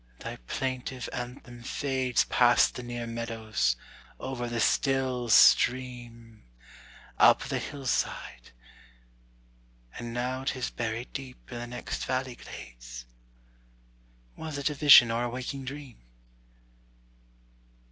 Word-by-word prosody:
thy - - -6
plaintive 130 -1 -3
anthem 125 0 -7
fades 130 0 0
Past 120 -1 +4
the - - -6
near 120 -1 -5
meadows, 115 - -1 0.4
over 120 -2 -4
the 120 -1 -2
still 130 -1 +1
stream, 120 -2 +3 0.8
Up - - +6
the - - -2
hillside; 130 - -3 1.5
and 120 -1 -5
now 125 +2 -2
'tis 130 -2 -2
buried 115 +1 -4
deep 135 -2 -9
In 120 - -5
the 120 - -5
next 120 0 -5
valley 130 -1 -2
glades: - - -10 1.3
Was 155 -2 -6
it 140 +1 0
a - - -3
vision 140 -5 +8
or 120 +1 0
a - - -2
waking 130 +2 -5
dream? 135 - -8
125 Hz, 110 wpm, -28 LUFS, 115-130 Hz, 1.5 s, vision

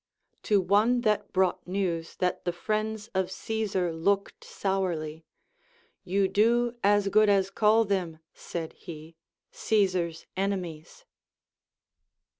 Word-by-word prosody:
To 205 -2 +3
one 210 +6 +3
that 215 -3 0
brought 185 -2 +1
news 180 -3 -2
that 180 -1 -1
the 175 - 0
friends 215 +4 -3
of 190 -1 0
Caesar 195 -4 -2
looked 200 +5 -1
sourly, 165 -5 -2 0.8
You 195 +1 +1
do 235 +4 +2
as 205 0 +3
good 215 +1 +4
as 195 -1 +2
call 220 +2 +4
them, 185 -5 -1 0.2
said 165 -2 -6
he, 160 0 -11 0.4
Caesar's 185 -6 0
enemies. 185 - -4
195 Hz, 110 wpm, -28 LUFS, 175-210 Hz, 0.8 s, good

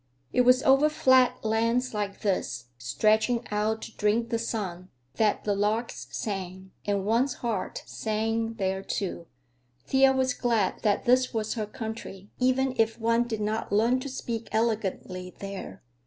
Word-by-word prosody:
It - - +4
was 250 +1 +5
over 275 +3 +5
flat 260 -5 +3
lands 230 +3 +1
like 205 -2 -3
this, 185 - -2
stretching 215 - +2
out 215 +1 0
to 225 - -9
drink 220 +2 +1
the 230 -1 0
sun, 190 -6 -4 0.3
that 215 -2 +2
the 205 - +1
larks 210 +4 -1
sang—and 190 0 -4
one's 240 +5 +2
heart 220 -5 -2
sang 225 +1 -2
there, 190 -2 -1
too. 180 -4 -4 0.6
Thea 265 - +5
was 260 -1 +1
glad 230 -5 0
that 210 +2 +1
this 255 0 +3
was 220 -1 -1
her 215 -2 -3
country, 220 -3 -7
even 255 +1 +2
if 225 +1 +1
one 230 +1 +2
did 220 -3 -3
not 215 +1 -2
learn 230 +5 +3
to 280 - -5
speak 235 -3 -4
elegantly 195 -5 -2
there. 195 - -7
220 Hz, 150 wpm, -27 LUFS, 205-240 Hz, 0.6 s, was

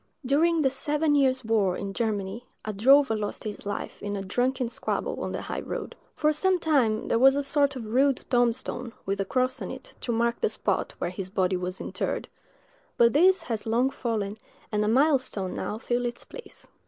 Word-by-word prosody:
During 320 +4 +3
the 265 - +3
seven 295 +3 0
years' 260 -3 +2
war 210 -5 +2
in 195 0 -5
Germany, 215 +1 -2 0.2
a 215 - -3
drover 265 +4 +5
lost 210 -1 -4
his 210 -1 -6
life 205 - -5
in 205 0 -3
a 195 - -3
drunken 250 +6 0
squabble 230 - -3
on - - -3
the - - -4
high - - -4
road. - - -5 0.2
For 305 0 +2
some 375 +4 +2
time 265 -10 +1
there 230 - +2
was 270 +2 +6
a 285 - 0
sort 280 0 +2
of 245 -3 -6
rude 260 +4 +2
tombstone, 245 0 0
with 195 +1 -1
a - - -1
cross 255 +2 0
on - - -4
it, - - -9
to 240 - -2
mark 235 +1 +1
the 455 - +1
spot - - -1
where 175 - -2
his 185 0 -5
body 185 -1 +1
was 180 +1 -3
interred; - - -3 0.7
but 235 -1 +5
this 365 +4 +5
has 225 -7 -3
long 245 +4 +2
fallen, 215 -5 -3 0.3
and 210 -1 +1
a - - 0
milestone 255 -6 +2
now 210 - -3
fills 240 +1 -1
its 240 - -6
place. - - -9
240 Hz, 200 wpm, -27 LUFS, 210-275 Hz, 0.7 s, was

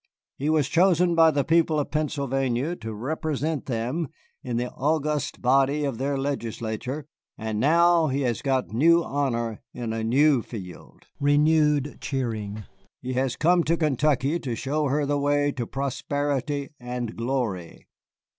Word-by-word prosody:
He 145 +3 0
was 155 -4 +2
chosen 175 +1 +3
by 165 -1 +6
the 145 -2 +1
people 160 -1 +2
of 145 - -3
Pennsylvania 140 -1 -1
to 110 0 -6
represent 150 +5 -3
them 130 +7 -2 0.3
in 125 -5 -3
the 125 +1 -2
august 150 0 -1
body 135 +3 +3
of 135 -5 -2
their 140 +1 -1
legislature, 130 0 -3 0.3
and 110 -1 -3
now 170 +4 +4
he 140 0 -1
has 120 -4 -1
got 135 -2 0
new 165 +8 +5
honor 120 -7 -2
in 115 -2 -3
a 115 0 -2
new 135 +3 +4
field 95 -6 -10
[renewed 150 0 +3
cheering]. 110 -6 -3 0.4
He 130 0 -4
has 130 0 0
come 175 +2 +3
to 165 +2 +2
Kentucky 150 0 +1
to 125 -7 -3
show 145 +6 -1
her 145 +2 +1
the 145 0 0
way 145 0 +2
to 120 -5 -4
prosperity 140 +1 -2
and 125 -2 -4
glory. 115 -8 -3
140 Hz, 145 wpm, -25 LUFS, 125-150 Hz, 0.4 s, by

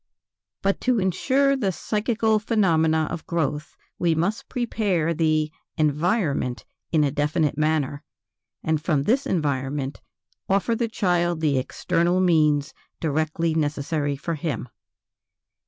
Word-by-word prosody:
But 195 0 +1
to 250 -3 +2
ensure 265 +9 +2
the 210 -8 0
psychical 220 +3 0
phenomena 160 -8 +2
of 165 - -6
growth, 155 -2 -2 0.2
we 170 -2 +2
must 185 +7 -1
prepare 205 - 0
the 155 -1 +1 0.3
"environment" 155 - 0 0.3
in 155 -2 +3
a 140 - +1
definite 150 +2 0
manner, 150 -2 0 0.6
and 160 -1 0
from 155 -4 +1
this 255 - +1
environment 140 -4 -1 0.5
offer 200 +4 +2
the 230 +1 0
child 175 -6 0
the 145 -4 +2
external 170 +7 0
means 155 -5 +3 0.3
directly 155 +1 0
necessary 145 -1 -1
for 165 +5 -3
him. 150 -6 -3
160 Hz, 120 wpm, -24 LUFS, 150-190 Hz, 0.6 s, in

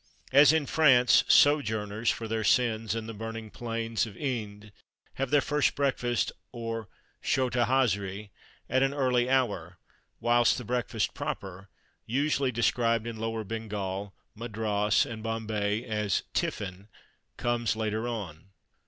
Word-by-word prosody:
As 140 +1 +8
in 160 -2 +1
France, 130 -6 +5
sojourners 110 -6 +3
(for 115 - -2
their 110 0 -2
sins) 115 -2 +2
in 115 -1 -4
the 115 - -6
burning 115 0 -7
plains 115 -1 -2
of 100 - -11
Ind 105 -6 -4 0.5
have 135 - 0
their 145 +1 +4
first 150 0 +1
breakfast, 125 -4 0 0.2
or 115 -2 -5 0.3
chota 125 -2 +1
hazri, 100 -6 0 0.4
at 130 - +1
an 135 +1 +1
early 125 -3 +2
hour, 100 -10 0 0.4
whilst 120 0 +3
the 125 - -5
breakfast 120 -2 -1
proper 95 0 -6 0.4
usually 140 +1 +1
described 115 -1 +1
in 115 -1 -5
Lower 115 0 -3
Bengal, 100 -2 -5 0.2
Madras, 105 -2 0
and 110 -1 -7
Bombay 110 -1 -2
as 105 -4 -1
"tiffin" 95 +1 -3 0.5
comes 120 -2 0
later 110 +1 -2
on. 100 -7 -6
115 Hz, 130 wpm, -28 LUFS, 105-125 Hz, 0.5 s, As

